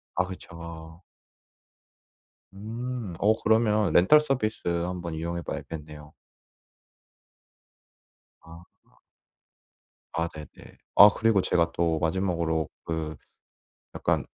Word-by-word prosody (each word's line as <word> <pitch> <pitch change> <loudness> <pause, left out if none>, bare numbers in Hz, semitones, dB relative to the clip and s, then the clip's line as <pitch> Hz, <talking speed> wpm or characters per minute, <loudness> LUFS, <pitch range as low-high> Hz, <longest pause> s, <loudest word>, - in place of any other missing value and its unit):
아 90 - +2
그쵸. 85 -2 -10 1.5
음 115 -1 -5
어 110 +2 +4
그러면 110 -4 +3
렌탈 125 +13 +6
서비스 125 -7 -2
한번 85 -1 -2
이용해 85 +2 -3
봐야겠네요. 75 -1 -8 2.3
아. 85 +2 -17 1.1
아 85 0 0
네네. 75 -2 -13 0.2
아 100 - +11
그리고 110 -3 +3
제가 85 -1 +1
또 85 -2 0
마지막으로 85 -2 0 0.2
그 80 -2 -3 0.8
약간 - - 0
85 Hz, 175 characters per minute, -27 LUFS, 80-105 Hz, 2.3 s, 아